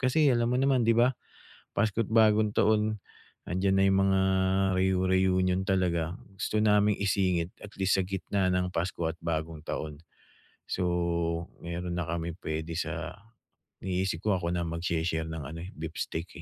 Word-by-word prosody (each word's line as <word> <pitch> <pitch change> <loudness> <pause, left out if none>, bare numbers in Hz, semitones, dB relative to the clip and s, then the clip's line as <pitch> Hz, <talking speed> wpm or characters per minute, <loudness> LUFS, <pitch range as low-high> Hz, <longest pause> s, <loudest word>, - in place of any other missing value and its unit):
kasi 135 +4 +3
alam 120 0 +2
mo 125 - +2
naman, 135 -2 +3
'di 115 0 +3
ba? 125 +2 +4 0.6
Pasko't 110 0 +1
Bagong 110 -1 +4
Taon. 110 0 +2 0.5
'Andiyan 95 +2 +1
na 95 - +4
mga 95 0 +3 0.6
reu-reunion 95 0 +2
talaga. 85 -3 +1 0.2
Gusto 105 +2 0
naming 105 -1 +4
isingit 90 -3 +1
at 105 - -11
least 95 0 +2
sa - - +2
gitna 95 0 -1
ng 90 0 +1
Pasko 85 0 -2
at 85 - -9
Bagong 80 -1 -3
Taon. 75 -2 -4 0.7
So 95 - -1 0.8
mayro'n 85 +1 -4
na 85 - -1
kaming 85 +1 -3
puwede 80 0 -4
sa - - -4 0.7
iniisip 95 -2 -1
ko 105 -3 +2
ako 85 -1 -2
na 90 - 0
magshe-share 85 -1 -1
ng 80 0 -5
ano, 80 +2 -7
eh, 95 - -9
beef 80 +1 -7
steak, 85 +2 -3
95 Hz, 155 wpm, -29 LUFS, 85-105 Hz, 0.8 s, ba